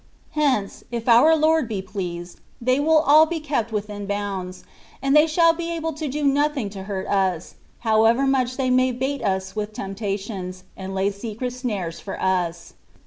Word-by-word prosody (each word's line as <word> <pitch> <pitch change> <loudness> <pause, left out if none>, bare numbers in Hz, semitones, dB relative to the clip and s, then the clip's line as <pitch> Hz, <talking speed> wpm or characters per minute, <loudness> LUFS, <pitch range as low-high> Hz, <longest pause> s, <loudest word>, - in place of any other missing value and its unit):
Hence, 270 -10 0
if 235 0 -4
our 250 +7 +7
Lord 315 -3 +3
be 215 -3 -3
pleased, 180 -3 -6 0.2
they 255 +3 +2
will 310 +1 +4
all 310 +2 +7
be 335 0 -3
kept 275 -7 -2
within 205 -1 -4
bounds, 195 -3 -4 0.4
and 275 +1 +1
they 300 +1 +7
shaU 330 +1 +4
be 335 0 -4
able 325 0 -3
to 305 +1 -4
do 295 +2 -3
nothing 280 -5 +1
to 195 -1 -8
hurt 195 -2 -4
us, 185 -4 0 0.3
however 225 +3 +3
much 255 -2 +1
they 260 -2 +1
may 255 0 +3
bait 265 +3 -2
us 190 -2 -2
with 210 0 -3
temptations, 195 -2 -5
and 190 0 -6
lay 195 +1 +1
secret 225 +4 -5
snares 210 -10 -4
for 195 - -7
us. 175 -3 -1
225 Hz, 175 wpm, -23 LUFS, 195-280 Hz, 0.4 s, our